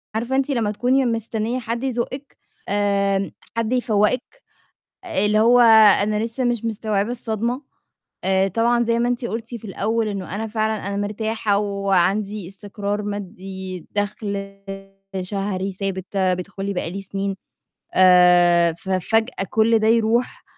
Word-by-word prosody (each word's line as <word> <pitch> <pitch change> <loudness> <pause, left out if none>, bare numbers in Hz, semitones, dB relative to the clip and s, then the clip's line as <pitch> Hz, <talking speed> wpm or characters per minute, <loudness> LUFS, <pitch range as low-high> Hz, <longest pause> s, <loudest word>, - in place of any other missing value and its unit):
عارفة 240 +4 -1
أنتِ 270 +1 +1
لمّا 230 -6 0
تكوني 255 +5 +1
مستنية 230 +1 -2
حد 235 +1 -4
يزُقِك، 265 +2 -4 0.3
آآ، 200 -1 +1 0.3
حد 230 +1 0
يفوّقِك، 245 - 0 0.6
اللي 210 - +1
هو 240 +2 +5 0.4
أنا 210 +1 0
لسه 235 +3 -3
مش 240 -2 0
مستوعبة 215 -1 -1
الصدمة. 235 +2 -2 0.6
آآ 190 0 +2
طبعًا 235 +4 +2
زي 230 0 +1
ما 240 +1 +1
أنتِ 245 0 -2
قُلتِ 225 0 -4
في 230 - -13
الأول 220 +3 -1
إنه 195 -2 -5
أنا 220 +2 -3
فعلًا 220 -1 -2
أنا 200 - -3
مرتاحة 210 0 -1
وعندي 200 0 0
استقرار 205 +1 -4
مادي، 190 -2 -6
دخل 200 -1 -3 0.6
شهري 195 0 -3
ثابت 190 0 -5
بيدخُل 190 +1 -1
لي 200 - -1
بقى 180 -2 -3
لي 195 +3 -5
سنين. 195 0 -3 0.6
آآ، 180 -2 +6
ففجأة 190 +5 -1
كُل 225 +1 +3
ده 215 - 0
يروح 230 +2 +1
210 Hz, 135 wpm, -22 LUFS, 195-230 Hz, 0.6 s, آآ